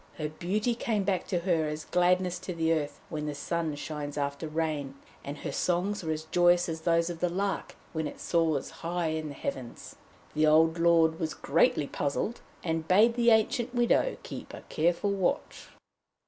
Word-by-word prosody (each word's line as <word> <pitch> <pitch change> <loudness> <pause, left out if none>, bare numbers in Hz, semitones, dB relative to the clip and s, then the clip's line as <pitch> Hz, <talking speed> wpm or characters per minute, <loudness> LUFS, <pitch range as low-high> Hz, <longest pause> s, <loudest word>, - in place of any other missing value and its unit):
Her 150 -2 -2
beauty 195 +9 -1
came 220 -3 -1
back 190 -2 -1
to 175 -2 0
her 170 -4 +1
as 150 0 -4
gladness 180 0 +2
to 185 -1 -6
the 165 0 +2
earth 150 -3 -2
when 150 -1 -3
the 150 - -3
sun 160 +1 -2
shines 145 0 -5
after 140 +2 -2
rain, 155 -3 -2 0.3
and 145 +1 -6
her 145 - -5
songs 180 +6 0
were 160 - -1
as 155 0 -3
joyous 175 +2 +3
as 160 -1 -4
those 170 +1 +2
of 170 - -7
the 180 - +1
lark 195 +3 -2 0.2
when 160 -2 -1
it - - -9
soars 160 -5 0
high 170 0 -1
in 155 0 -2
the 145 - -8
heavens. 125 -3 -6 0.4
The 155 0 +3
old 160 +2 +4
lord 165 -1 +4
was 160 -2 -2
greatly 145 - +2
puzzled, 145 +12 -2 0.2
and 160 -1 -2
bade 215 +6 +5
the 240 0 +3
ancient 240 +2 +2
widow 240 - +2
keep - - -8
a - - -10
careful 170 +5 +1
watch. 195 -3 -1
165 Hz, 185 wpm, -29 LUFS, 155-180 Hz, 0.4 s, bade